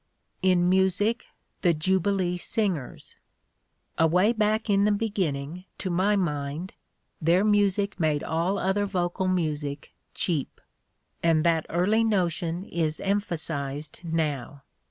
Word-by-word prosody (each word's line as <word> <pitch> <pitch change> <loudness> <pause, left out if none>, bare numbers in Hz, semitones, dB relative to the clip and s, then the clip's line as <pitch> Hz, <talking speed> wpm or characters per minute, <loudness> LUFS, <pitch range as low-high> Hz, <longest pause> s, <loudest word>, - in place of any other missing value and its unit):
In 180 -2 +3
music, 190 +5 +2 0.3
the 175 -3 +3
Jubilee 185 +2 +1
Singers: 185 - -3 0.8
"Away 180 +7 +4
back 215 0 +1
in 200 -1 +3
the 210 - +3
beginning 180 -6 -2
— - - -47
to 185 - -3
my 190 +4 +2
mind 150 -1 -2 0.2
— - - -47
their 170 +4 +3
music 200 -1 +2
made 155 -3 +1
all 170 +5 0
other 200 +2 0
vocal 185 0 -1
music 150 -5 -2 0.2
cheap; 160 -7 -1 0.6
and 165 -2 +3
that 165 -2 +2
early 205 +7 +2
notion 175 -4 0
is 160 -4 -2
emphasized 160 -8 -2
now. 150 -5 -2
180 Hz, 120 wpm, -26 LUFS, 160-200 Hz, 0.8 s, Away